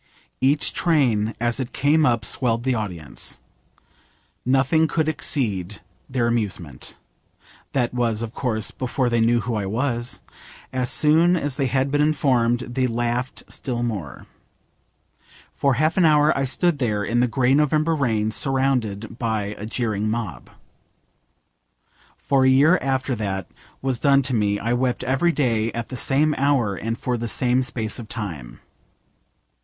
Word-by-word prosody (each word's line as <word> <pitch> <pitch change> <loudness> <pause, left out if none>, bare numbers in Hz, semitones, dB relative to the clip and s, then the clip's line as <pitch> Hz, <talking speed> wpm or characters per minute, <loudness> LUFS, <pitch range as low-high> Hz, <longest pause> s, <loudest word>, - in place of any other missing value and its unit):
Each 140 +3 +3
train 120 -10 +1
as 120 +2 0
it 130 -1 -4
came 150 +3 +3
up 115 -4 +1
swelled 120 -2 +1
the 130 0 +1
audience. 90 -10 -5 1.0
Nothing 135 +5 +2
could 155 0 0
exceed 105 - -1 0.3
their 125 -3 0
amusement. 100 - -3 0.8
That 125 -3 0
was, 115 -2 0
of 115 0 -6
course, 110 -6 -1
before 130 0 -1
they 120 -1 +2
knew 120 +1 +3
who 120 - -3
I 105 -3 -2
was. 120 +2 -2 0.5
As 125 -1 0
soon 165 +4 +4
as 145 -5 -2
they 135 -3 +1
had 135 +1 0
been 145 0 +2
informed 125 -6 +2
they 130 +1 -1
laughed 120 +2 -2
still 120 -3 -4
more. 100 - -5 1.3
For 140 -2 +1
half 155 +7 +1
an 180 - +5
hour 150 -1 +4
I 135 - 0
stood 150 +4 +1
there 105 -5 0
in 120 +3 0
the 125 - +3
grey 125 +2 +2
November 150 +2 +2
rain 110 -7 0
surrounded 120 -5 0
by 110 -3 -2
a 105 - -7
jeering 110 -3 -1
mob. 105 - -4 1.7
For 135 -1 +1
a 130 - +5
year 150 +7 +5
after 130 0 -1
that 95 -2 -3 0.4
was 130 -3 0
done 140 -1 +4
to 130 - -2
me 105 -3 +1
I 115 +4 -1
wept 125 0 0
every 135 +7 +2
day 115 -7 0
at 115 -1 -5
the 130 - -6
same 145 +5 +2
hour 135 -7 +2
and 115 +4 -4
for 125 -2 -2
the 120 - -3
same 125 +2 +1
space 115 -4 -2
of 110 -2 -9
time. 80 - -7
125 Hz, 155 wpm, -22 LUFS, 110-135 Hz, 1.7 s, an